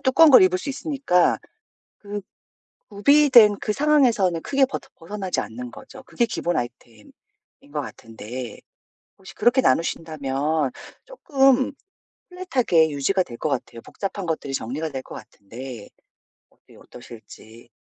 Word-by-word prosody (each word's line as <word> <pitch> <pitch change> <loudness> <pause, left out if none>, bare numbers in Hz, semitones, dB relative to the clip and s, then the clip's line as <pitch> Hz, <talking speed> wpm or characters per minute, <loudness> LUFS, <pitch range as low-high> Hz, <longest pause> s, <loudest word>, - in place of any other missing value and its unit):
두꺼운 300 +4 +5
걸 255 - +9
입을 185 0 +3
수 285 - -7
있으니까 275 - +1 0.6
그 205 0 -6 0.7
구비된 235 -1 +5
그 210 - -2
상황에서는 245 - +2
크게 275 - +2
버터 265 - -7
벗어나지 190 +2 -4
않는 120 +2 -8
거죠. - - -13
그게 240 - -1
기본 175 -6 -2
아이템인 120 -3 -7 0.6
거 150 - -1
같은데 115 +1 -9 0.6
혹시 190 - -13
그렇게 240 +4 +3
나누신다면 150 - -1 0.3
쪼끔 270 - +2 0.6
플랫하게 260 - +1
유지가 150 +7 0
될 120 -8 -11
것 155 - -2
같아요. 120 -3 -4
복잡한 195 -1 -6
것들이 155 -4 -3
정리가 135 +6 -3
될 135 -3 -5
것 - - -11
같은데 115 +2 -10 0.6
어때요, - - -22
어떠실지? 115 -1 -14
175 Hz, 305 characters per minute, -23 LUFS, -, 0.7 s, 걸